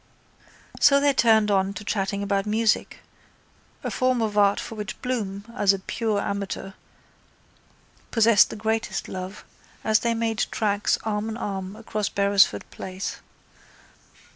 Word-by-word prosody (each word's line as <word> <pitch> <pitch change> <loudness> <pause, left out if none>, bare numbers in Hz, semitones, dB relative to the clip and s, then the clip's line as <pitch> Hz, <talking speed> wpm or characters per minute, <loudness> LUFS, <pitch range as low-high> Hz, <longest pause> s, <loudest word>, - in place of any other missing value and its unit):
So 280 -1 +6
they 285 0 +3
turned 220 -4 +4
on 195 0 +1
to 205 - -7
chatting 200 -1 -1
about 200 0 0
music, 220 +1 0 0.8
a - - -3
form 255 -1 +1
of 220 -2 -1
art 200 -1 +4
for - - -6
which 210 -2 -6
Bloom, 205 -6 -3
as 200 -1 +4
a - - -2
pure 215 +2 -2
amateur, 200 -1 -4 1.4
possessed 225 -2 +5
the - - -6
greatest 220 +1 -2
love, 185 +2 -7 0.4
as 215 -1 +3
they 235 -1 0
made 225 -1 0
tracks 205 -1 +1
arm 215 0 -2
in 220 - -5
arm 195 -3 -4
across 215 -2 -3
Beresford 200 - +3
place. 185 +1 -5
210 Hz, 140 wpm, -25 LUFS, 200-225 Hz, 1.4 s, So